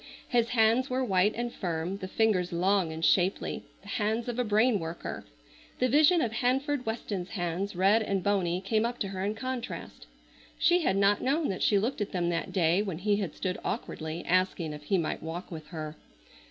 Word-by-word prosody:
His 235 -3 +2
hands 230 +2 +3
were 255 +1 0
white 195 0 +2
and 240 0 -3
firm, 175 +1 -3
the 185 - -5
fingers 190 -3 +1
long 185 0 +2
and 160 +1 -2
shapely, 185 +4 +2 0.2
the - - -15
hands 220 +2 -1
of 245 0 -3
a - - +3
brain 215 +1 +3
worker. 165 0 -6 0.5
The 255 - +2
vision 310 +6 +5
of 230 - -1
Hanford 260 +3 0
Weston's 205 -5 -3
hands, 180 +2 -3
red 195 +5 +4
and 195 -3 -1
bony, 185 -3 +1
came 215 +3 +1
up 240 +1 -2
to 195 - -1
her 190 -1 -4
in 205 +2 -1
contrast. 255 +1 -6 0.5
She 355 0 +4
had 195 -11 +1
not 200 +1 +3
known 295 +4 +1
that 190 - -3
she 205 - +4
looked 225 +4 -1
at 205 - -3
them 175 -2 0
that 170 -1 -2
day 175 0 +3
when 190 -6 -3
he 205 +3 +1
had 195 -7 -3
stood 185 -1 -3
awkwardly 160 +2 -4
asking 180 -3 +1
if 150 0 -10
he 195 - +2
might 165 -3 -2
walk 165 +4 -6
with 155 -2 -7
her. 155 -1 -6
200 Hz, 200 wpm, -29 LUFS, 175-230 Hz, 0.5 s, vision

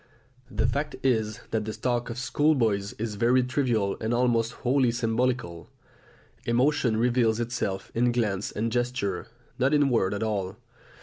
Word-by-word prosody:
The 110 -2 0
fact 145 +4 -1
is 110 -5 +1
that 110 -1 -1
the 110 - -4
talk 120 0 -1
of 115 - -5
schoolboys 125 -6 +1
is 110 0 -4
very 125 +2 +4
trivial 125 -6 0
and 115 +2 0
almost 120 -2 +2
wholly 130 0 +3
symbolical; 115 -6 -1 0.7
emotion 120 -1 +2
reveals 120 -1 +2
itself 115 -5 -3
in 120 +1 +2
glance 105 -5 -1
and 115 +2 -2
gesture, 120 -6 -1 0.3
not 135 +4 +3
in 145 -2 +3
word 105 -5 +1
at 100 - -2
all. 100 -4 -2
120 Hz, 145 wpm, -27 LUFS, 110-125 Hz, 0.7 s, very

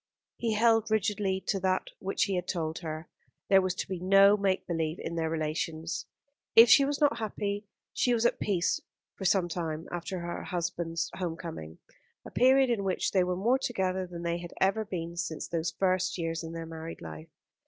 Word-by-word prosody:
He 230 -2 0
held 225 0 +3
rigidly 205 -2 0
to 195 - 0
that 185 0 0
which 195 - 0
he 200 - 0
had 180 -1 -2
told 160 -3 -2
her. 160 -1 -6 0.4
There 195 -1 +7
was 185 -1 -1
to - - -4
be 190 -2 -4
no 195 +2 +6
make 195 -2 0
believe 165 -1 -2
in 170 - -5
their 165 -1 -1
relations. 160 +1 -3 0.5
If 230 +1 +9
she 280 - +8
was 285 +1 -1
not 285 -6 +3
happy, 205 -1 -3 0.3
she 250 - +2
was 235 -1 +2
at - - +2
peace 185 -4 0 0.3
for 190 - -7
some 185 -1 +3
time 165 -2 -4
after 175 +2 -4
her 170 0 -4
husband's 170 -2 -2
home 170 -3 -3
coming 80 - -7 0.5
a - - -9
period 260 0 +5
in 215 -4 0
which 190 -1 0
they 190 -2 +3
were 180 0 -1
more 240 +7 +2
together 190 -7 -1
than 170 -1 -7
they 170 0 -1
had 175 0 -8
ever 195 +3 +2
been 170 -3 -5
since 170 -3 -3
those 165 0 -1
first 185 -1 0
years 165 -1 -2
of 165 - -6
their 165 0 -5
married 165 0 -8
life. 80 -1 -9
185 Hz, 195 wpm, -29 LUFS, 165-200 Hz, 0.5 s, If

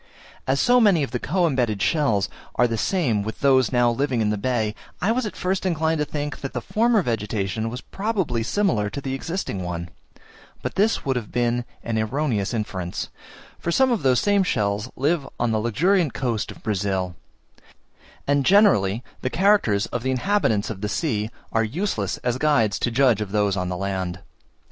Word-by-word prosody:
As 135 +1 +2
so 245 0 +5
many 195 -9 +4
of 135 - -4
the 125 - -2
co 180 +6 +1
embedded 125 -9 0
shells 110 - +2 0.3
are 125 - +4
the 115 - -2
same 120 - +1
with 110 +2 -6
those 130 -4 +4
now 120 -2 +3
living 130 0 0
in 105 -1 +1
the - - 0
bay, 110 -2 0 0.3
I 200 - +1
was 240 -1 0
at - - -7
first 185 +1 -1
inclined 160 -3 0
to 150 - +1
think 145 -1 -4
that 135 -2 -5
the 125 - -1
former 225 - +2
vegetation 110 -2 -2
was 125 +3 -6
probably 195 - -2
similar 115 - +1
to 140 - -5
the 135 -1 -4
existing 135 - -3
one; 85 -1 -4 0.7
but - - -3
this 215 +3 +1
would 135 -2 +1
have 115 -4 -5
been 120 0 0 0.2
an 115 -1 -1
erroneous 110 -3 -1
inference 95 -6 -3 0.5
for 170 - -2
some 260 +7 +3
of 230 - +1
these 130 -2 +3
same 205 +5 +3
shells 105 - 0
live 145 +1 0
on 120 -1 +1
the 110 - +1
luxuriant 155 - +1
coast 120 -5 -1
of - - -11
Brazil; 95 -4 -1 1.1
and 140 0 +2
generally, 130 - +4 0.2
the 130 - -1
character 190 - +3 0.2
of 120 - -1
the 130 - -2
inhabitants 130 - +1
of 95 -3 -7
the 105 - -2
sea 110 -4 -1 0.2
are 115 - +2
useless 110 - -2
as 125 0 0
guides 115 -9 +2
to - - +1
judge 120 -3 +3
of 100 -2 -4
those 105 -2 +1
on 90 -2 -2
the 90 - -3
land. 95 -2 -2
125 Hz, 190 wpm, -23 LUFS, 105-160 Hz, 1.1 s, so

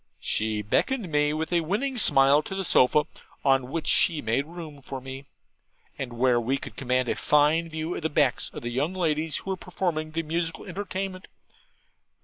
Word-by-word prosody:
She 110 -1 0
beckoned 200 - 0
me 150 0 +3
with 160 +3 -3
a 170 - +3
winning 215 - -1
smile 135 -4 +5
to 190 - -6
the 195 -1 -2
sofa, 150 0 +4 0.4
on 135 -2 +3
which 165 +2 -3
she 165 -3 +3
made 120 +4 0
room 160 -4 -9
for 135 0 -6
me, 135 +1 -8 0.7
and 125 -2 -5
where 120 0 +2
we 130 +4 0
could - - -9
command 130 -1 0
a - - 0
fine 150 +3 +3
view 160 +2 -3
of - - -5
the 160 - -1
backs 145 -4 +1
of - - -8
the 120 - -3
young 145 +9 -1
ladies 160 -3 0
who 195 - -5
were 190 - -2
performing 170 -4 -2
the 165 +1 -3
musical 165 +1 -3
entertainment. 190 0 -5
155 Hz, 185 wpm, -26 LUFS, 135-170 Hz, 0.7 s, smile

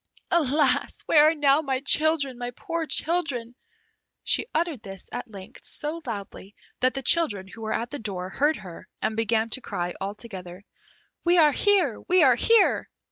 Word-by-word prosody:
"Alas! 295 -5 +2
where 300 -1 +6
are 325 - -1
now 290 0 +3
my 270 -4 -1
children, 290 -2 0
my 245 0 -3
poor 330 -1 -4
children?" 275 -6 0 0.7
She - - +2
uttered 320 -6 -1
this, 195 -2 -11
at 245 -1 -6
length, 195 -3 -12
so 315 +2 -2
loudly, 200 -2 -7 0.2
that 255 +1 +2
the 270 - -4
children, 220 - +1
who 225 +4 -12
were 220 - -4
at 235 +2 -3
the 290 - -5
door, 185 -4 -5
heard 295 +7 +1
her, 180 -3 -11
and 220 0 0
began 225 0 0
to 260 - -2
cry 175 -5 -4
altogether, 195 -2 -7 0.6
"We 350 +1 +3
are 305 -3 +6
here! 365 - +2
we 360 -1 +5
are 260 -3 +6
here!" 450 - +3
260 Hz, 170 wpm, -25 LUFS, 215-315 Hz, 0.7 s, where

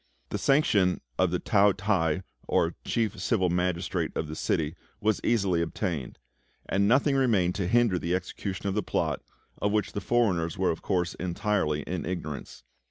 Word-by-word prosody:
The - - -3
sanction 105 -10 +3 0.2
of 95 - +4
the 90 - 0
Tao 100 0 +4
t'ai, 95 -4 0 0.2
or 85 +1 +2
chief 110 -4 -1
civil 95 -4 +1
magistrate 90 0 -1
of 80 - -2
the 75 - -6
city, 80 0 -1 0.2
was 110 0 +1
easily 100 -7 +2
obtained; 80 -4 -3 0.5
and 100 +1 +2
nothing 135 +5 +4
remained 105 -10 +3
to 95 -3 -1
hinder 115 -3 +3
the 85 +2 0
execution 95 +1 -4
of 95 - 0
the 105 - +1
plot, - - -1 0.4
of 105 - +1
which 105 0 0
the 100 - -3
foreigners 95 -8 +1
were 95 - +2
of 80 - -5
course 90 -4 0
entirely 90 -4 -1
in 90 0 -4
ignorance. 75 -8 -5
95 Hz, 165 wpm, -28 LUFS, 85-105 Hz, 0.5 s, of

